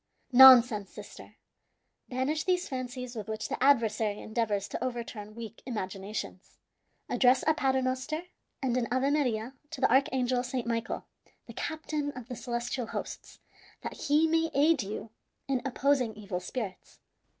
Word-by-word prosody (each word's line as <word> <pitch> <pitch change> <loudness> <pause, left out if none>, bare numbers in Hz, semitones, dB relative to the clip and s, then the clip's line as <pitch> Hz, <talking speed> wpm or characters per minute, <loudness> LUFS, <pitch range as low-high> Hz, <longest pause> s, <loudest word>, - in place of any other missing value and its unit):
"Nonsense, 245 -5 +8
sister! - - -12 0.7
Banish 265 +5 -1
these 360 -1 +1
fancies 250 -1 -5
with 215 -3 -5
which 215 0 -4
the - - -2
adversary 225 -6 +3
endeavors 215 -3 -1
to - - -4
overturn 230 -4 -5
weak 230 -1 -8
imaginations. 200 -3 -6 0.5
Address 255 0 +4
a 315 - +4
Paternoster 265 +2 0 0.4
and 250 -2 +1
an 240 -2 0
Ave 260 +3 +2
Maria 250 -5 0 0.2
to 320 - -7
the 265 - +3
archangel, 260 -2 +2
Saint 250 -1 -3
Michael, 230 -1 -2 0.4
the - - -10
captain 310 -2 -3
of 250 -1 -9
the 250 - -4
celestial 240 0 -3
hosts, - - -6 0.5
that - - -4
he 305 +1 +2
may 325 0 +2
aid 295 +1 +4
you 210 +2 -6 0.4
in 265 -2 0
opposing 265 -3 +1
evil 200 -4 -4
spirits. 195 +1 -6
250 Hz, 140 wpm, -29 LUFS, 225-270 Hz, 0.7 s, Nonsense